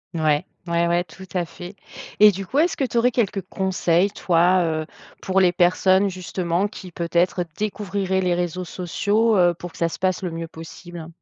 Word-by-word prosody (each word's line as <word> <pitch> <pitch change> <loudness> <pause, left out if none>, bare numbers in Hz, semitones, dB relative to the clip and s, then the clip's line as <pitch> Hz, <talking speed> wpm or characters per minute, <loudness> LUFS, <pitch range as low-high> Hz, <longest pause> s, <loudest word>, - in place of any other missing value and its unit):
Ouais, 155 +1 +1 0.2
ouais, 170 0 +1
ouais, 175 +1 +2
tout 180 +2 -13
à 180 -2 0
fait. 175 +3 -10 0.4
Et 210 0 +8
du 195 +1 -6
coup, 275 +9 0
est-ce 340 +2 +2
que 275 - 0
tu 240 -2 -2
aurais 245 +2 +4
quelques 205 -5 0
conseils, 185 0 0
toi, 180 -1 +3
heu, 155 -1 -1 0.4
pour 190 0 +1
les 180 - +5
personnes, 185 +2 +3
justement, 180 0 -2
qui 190 -3 -10
peut-être 175 +2 0
découvriraient 200 -2 -1
les 180 -1 +1
réseaux 180 +1 -2
sociaux, 205 +6 0
heu, 175 -1 +4
pour 175 0 -8
que - - -16
ça 170 - +1
se - - -7
passe 185 0 0
le 180 - -2
mieux 165 0 -5
possible? 165 +1 -10
180 Hz, 195 wpm, -22 LUFS, 170-195 Hz, 0.4 s, Et